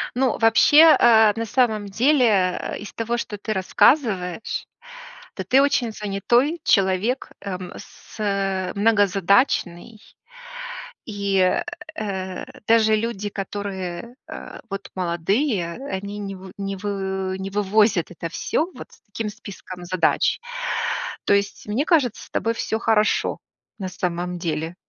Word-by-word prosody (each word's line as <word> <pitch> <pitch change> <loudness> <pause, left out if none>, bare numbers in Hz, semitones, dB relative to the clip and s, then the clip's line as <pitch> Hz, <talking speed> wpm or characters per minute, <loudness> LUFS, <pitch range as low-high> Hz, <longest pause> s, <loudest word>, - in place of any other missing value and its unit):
Ну, 255 -1 +1
вообще, 290 +8 +7
а, 220 -3 +6
на 230 0 -2
самом 220 -3 +1
деле, 250 +7 +3
э, 185 -3 0
из 210 - -9
того, 230 +1 -2
что 210 -3 -5
ты 215 +2 -3
рассказываешь, 190 - +1 0.7
то 190 - -4
ты 255 +9 +4
очень 265 -5 +1
занятой 235 - 0
человек, 195 +6 +1
эм, 185 -2 -6
с - - -14
э, 195 -3 -1
многозадачный. 200 -1 +2 1.1
И, 200 -3 -1 0.6
э, 190 -5 -4 0.2
даже 220 -1 +5
люди, 215 -2 -3
которые, 195 +1 -5
а, - - -9
вот 195 0 -6
молодые, 180 - 0 0.2
они 200 +2 -4
не 195 -1 -5
в 185 0 -11
не 195 0 -3
вы 190 -1 -3
не 190 +1 -5
вывозят 205 -2 +2
это 170 -1 -6
всё, 320 - -1
вот - - -11
с - - -19
таким 215 +1 -5
списком 195 -4 -10
задач. 180 -1 +1 0.9
То - - +4
есть 200 +1 -1
мне 235 +8 0
кажется, 290 - +2
с - - -19
тобой 230 0 -1
всё 220 -1 -2
хорошо, 220 -2 +1 0.4
на 190 -3 -4
самом 180 -1 -3
деле. 165 0 -3
200 Hz, 130 wpm, -23 LUFS, 190-225 Hz, 1.1 s, вообще